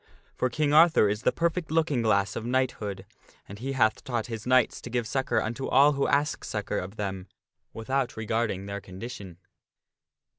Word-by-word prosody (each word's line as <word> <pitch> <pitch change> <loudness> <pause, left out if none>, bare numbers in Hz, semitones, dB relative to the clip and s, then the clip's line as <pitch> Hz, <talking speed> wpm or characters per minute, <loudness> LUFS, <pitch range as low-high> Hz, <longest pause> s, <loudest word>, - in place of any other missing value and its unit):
For 130 - 0
King 145 +4 0
Arthur 160 -7 +6
is 105 +1 -1
the - - +2
perfect 170 0 -1
looking 155 -5 +1
glass 100 -3 +1
of - - -4
knighthood, 120 -5 -2 0.4
and 100 +1 -10
he 135 +3 -3
hath 110 -5 +2
taught 120 -5 -2
his 115 -1 -6
knights 130 -1 +3
to - - -8
give 120 -1 -1
succor 130 +3 0
unto 120 +4 -3
all 140 +3 +5
who 140 -1 0
ask 145 +3 +1
succor 105 -1 -3
of 95 +3 -7
them, 95 -3 -4 0.4
without 130 +2 -2
regarding 110 -3 -1
their 100 0 -5
condition. 95 -2 -9
120 Hz, 175 wpm, -27 LUFS, 105-135 Hz, 0.4 s, Arthur